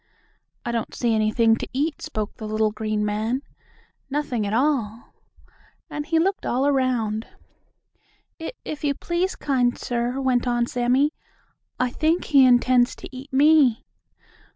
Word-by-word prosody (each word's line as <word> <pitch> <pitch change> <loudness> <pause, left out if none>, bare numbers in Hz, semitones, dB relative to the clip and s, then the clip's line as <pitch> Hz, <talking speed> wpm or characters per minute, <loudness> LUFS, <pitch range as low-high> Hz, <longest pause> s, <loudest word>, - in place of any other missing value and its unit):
"I 240 - -1
don't 230 -1 -3
see 235 -2 +1
anything 220 +1 +3
to - - -5
eat," 295 +4 -1
spoke 215 -9 -4
the 215 - -6
little 215 0 +1
green 215 0 -2
man. 220 +6 -1 0.7
"Nothing 265 -7 -1
at - - -3
all," 235 -4 -1 0.8
and 295 0 -4
he 325 - +1
looked 380 +4 +1
all 255 +3 0
around. 250 -6 0 1.1
"If 325 - -5
if 305 0 -6
you 285 -1 +1
please, 350 +5 -1
kind 250 -4 0
sir," 245 +2 -2
went 255 -2 +1
on 240 -1 +1
Sammie, 250 +5 +1 0.7
"I 250 -1 +1
think 320 +6 +1
he 280 -4 +5
intends 245 0 +4
to - - -11
eat 265 +3 -10
me." 280 -3 +4
250 Hz, 145 wpm, -23 LUFS, 225-285 Hz, 1.1 s, he